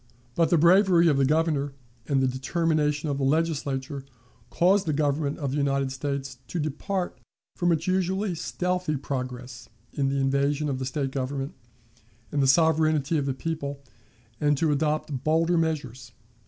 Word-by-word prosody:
But 165 Hz, +3 st, +2 dB
the 170 Hz, -, +4 dB
bravery 175 Hz, +1 st, +5 dB
of 145 Hz, -, +2 dB
the 135 Hz, -, +3 dB
Governor 150 Hz, -2 st, +1 dB, 0.3 s
and 135 Hz, -2 st, +2 dB
the -, -, +3 dB
determination 150 Hz, +3 st, 0 dB
of 140 Hz, -1 st, -1 dB
the -, -, -1 dB
Legislature 140 Hz, -2 st, -1 dB, 0.5 s
caused 185 Hz, +2 st, +3 dB
the 155 Hz, -, +1 dB
Government 145 Hz, 0 st, 0 dB
of 140 Hz, -3 st, -3 dB
the 140 Hz, -, -2 dB
United 140 Hz, -1 st, 0 dB
States 135 Hz, -1 st, -4 dB
to -, -, -5 dB
depart 175 Hz, +5 st, -3 dB, 0.4 s
from 175 Hz, -1 st, +1 dB
its 165 Hz, 0 st, 0 dB
usually 190 Hz, +1 st, 0 dB
stealthy 180 Hz, -1 st, -2 dB
progress 125 Hz, -2 st, -6 dB, 0.2 s
in 135 Hz, -1 st, 0 dB
the 140 Hz, -, -1 dB
invasion 140 Hz, +2 st, +1 dB
of 130 Hz, -2 st, -2 dB
the 130 Hz, -, -3 dB
State 135 Hz, 0 st, -2 dB
government 135 Hz, +1 st, -3 dB, 0.8 s
and 145 Hz, -, +1 dB
the 135 Hz, -, +3 dB
sovereignty 155 Hz, 0 st, +3 dB
of 140 Hz, -, -2 dB
the 135 Hz, -, -1 dB
people, 140 Hz, -2 st, -4 dB, 0.6 s
and 145 Hz, -1 st, +2 dB
to 155 Hz, +1 st, +2 dB
adopt 150 Hz, -2 st, -1 dB
bolder 165 Hz, +3 st, +2 dB
measures. 145 Hz, -8 st, -2 dB
145 Hz, 160 wpm, -26 LUFS, 135-165 Hz, 0.8 s, bravery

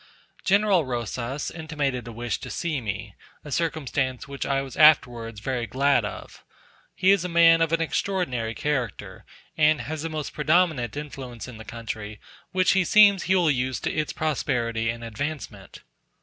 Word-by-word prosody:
General 200 Hz, -3 st, +3 dB
Rosas 125 Hz, +2 st, -4 dB
intimated 145 Hz, -6 st, -3 dB
a -, -, -6 dB
wish 120 Hz, +1 st, -3 dB
to -, -, -8 dB
see 155 Hz, -6 st, -2 dB
me; 105 Hz, -1 st, -5 dB, 0.3 s
a 150 Hz, -, -8 dB
circumstance 145 Hz, -6 st, -1 dB
which 140 Hz, -1 st, -5 dB
I 135 Hz, -1 st, +1 dB
was 135 Hz, -2 st, -9 dB
afterwards 120 Hz, -8 st, +4 dB
very 125 Hz, -1 st, -2 dB
glad 135 Hz, +1 st, +2 dB
of. 105 Hz, -, -8 dB, 0.5 s
He 190 Hz, -, +4 dB
is 200 Hz, -3 st, +3 dB
a 180 Hz, -, -3 dB
man 165 Hz, -1 st, +6 dB
of 165 Hz, -1 st, +2 dB
an 165 Hz, 0 st, +1 dB
extraordinary 145 Hz, -, -1 dB
character, 130 Hz, -5 st, -3 dB, 0.3 s
and 155 Hz, -1 st, +3 dB
has 155 Hz, 0 st, -5 dB
a 165 Hz, -, -3 dB
most 155 Hz, -2 st, -5 dB
predominant 155 Hz, -6 st, +1 dB
influence 135 Hz, -6 st, -7 dB
in 125 Hz, -3 st, -10 dB
the -, -, -8 dB
country, 110 Hz, -2 st, -6 dB, 0.3 s
which 185 Hz, +1 st, +3 dB
it 190 Hz, -3 st, +2 dB
seems 205 Hz, -3 st, +6 dB
he 190 Hz, -, +3 dB
will 175 Hz, -4 st, +4 dB
use 130 Hz, -1 st, -1 dB
to -, -, -2 dB
its 155 Hz, -1 st, -1 dB
prosperity 120 Hz, -7 st, -1 dB
and 115 Hz, 0 st, -4 dB
advancement. 115 Hz, -4 st, -6 dB
140 Hz, 165 wpm, -25 LUFS, 120-160 Hz, 0.5 s, man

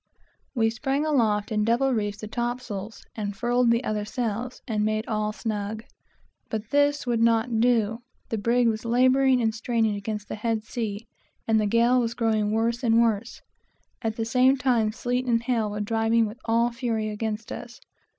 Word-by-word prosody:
We 225 Hz, -2 st, +2 dB
sprang 275 Hz, +5 st, -1 dB
aloft 220 Hz, -9 st, +1 dB
and 210 Hz, -1 st, +1 dB
double 245 Hz, +4 st, +2 dB
reefed 205 Hz, -2 st, -2 dB
the 215 Hz, -, -5 dB
topsails, 235 Hz, -3 st, -4 dB
and 205 Hz, -2 st, -4 dB
furled 245 Hz, +2 st, +2 dB
all -, -, +5 dB
the 235 Hz, +2 st, +1 dB
other 210 Hz, -3 st, -1 dB
sails, 235 Hz, +2 st, -3 dB
and 215 Hz, -3 st, 0 dB
made 215 Hz, +1 st, 0 dB
all 215 Hz, -1 st, -1 dB
snug. 215 Hz, 0 st, -4 dB, 0.7 s
But 215 Hz, 0 st, -5 dB
this 285 Hz, 0 st, +2 dB
would 235 Hz, -2 st, 0 dB
not 230 Hz, 0 st, +2 dB
do; 225 Hz, -2 st, +2 dB, 0.3 s
the 225 Hz, -, -2 dB
brig 235 Hz, +3 st, +2 dB
was 220 Hz, -1 st, -1 dB
laboring 255 Hz, +2 st, +4 dB
and 220 Hz, -1 st, +1 dB
straining 225 Hz, -1 st, 0 dB
against 210 Hz, 0 st, -5 dB
the -, -, -5 dB
head 220 Hz, 0 st, -1 dB
sea, 220 Hz, -1 st, -4 dB, 0.4 s
and 220 Hz, -1 st, +3 dB
the 210 Hz, -, +1 dB
gale 235 Hz, +4 st, +3 dB
was 235 Hz, -1 st, -1 dB
growing 220 Hz, -3 st, +1 dB
worse 230 Hz, +2 st, 0 dB
and 230 Hz, -2 st, +3 dB
worse. 230 Hz, 0 st, 0 dB, 0.6 s
At 225 Hz, -2 st, -2 dB
the 225 Hz, -, -2 dB
same 255 Hz, +3 st, +4 dB
time 245 Hz, -4 st, +2 dB
the 215 Hz, -, -9 dB
sleet 250 Hz, +1 st, -1 dB
and 230 Hz, -1 st, +2 dB
hail 230 Hz, -3 st, 0 dB
were 210 Hz, 0 st, -4 dB
driving 225 Hz, +2 st, +2 dB
with 215 Hz, +3 st, -7 dB
all 235 Hz, +1 st, +2 dB
fury 230 Hz, -3 st, -2 dB
against 215 Hz, 0 st, -4 dB
us. 240 Hz, 0 st, -8 dB
225 Hz, 185 wpm, -25 LUFS, 215-240 Hz, 0.7 s, all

